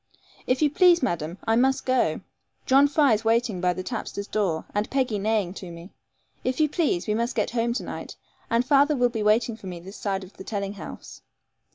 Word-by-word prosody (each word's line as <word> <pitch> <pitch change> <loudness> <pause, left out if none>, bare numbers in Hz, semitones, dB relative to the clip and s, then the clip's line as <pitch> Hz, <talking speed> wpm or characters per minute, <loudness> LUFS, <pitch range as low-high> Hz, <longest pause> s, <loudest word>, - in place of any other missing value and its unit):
'If 255 +4 +2
you 295 - +3
please, 350 0 +5
madam, 170 -6 -2
I 225 0 +2
must 265 +3 +2
go. 255 -1 +1 0.4
John 275 +2 +5
Fry 285 -3 +3
is 215 +1 0
waiting 225 -4 +1
by 180 -1 +2
the 185 - -5
tapster's 200 -2 -5
door, 195 -7 -1
and 205 +1 -1
Peggy 255 -6 0
neighing 205 -3 0
to 185 -2 -8
me. 170 +3 -11 0.5
If 255 +2 -1
you 310 - +4
please, 290 - 0
we 210 - 0
must 235 +3 -1
get - - 0
home 235 0 0
to - - -2
night; - - -7 0.3
and 230 +2 +2
father 285 +2 +4
will 245 -2 +3
be 225 -2 -4
waiting 220 +2 +2
for 200 - -11
me 180 -2 -6
this 190 +4 -11
side 195 -2 -2
of 190 +2 -13
the - - -8
telling 200 -1 -3
house.' 185 -6 -10
225 Hz, 215 wpm, -25 LUFS, 195-255 Hz, 0.5 s, please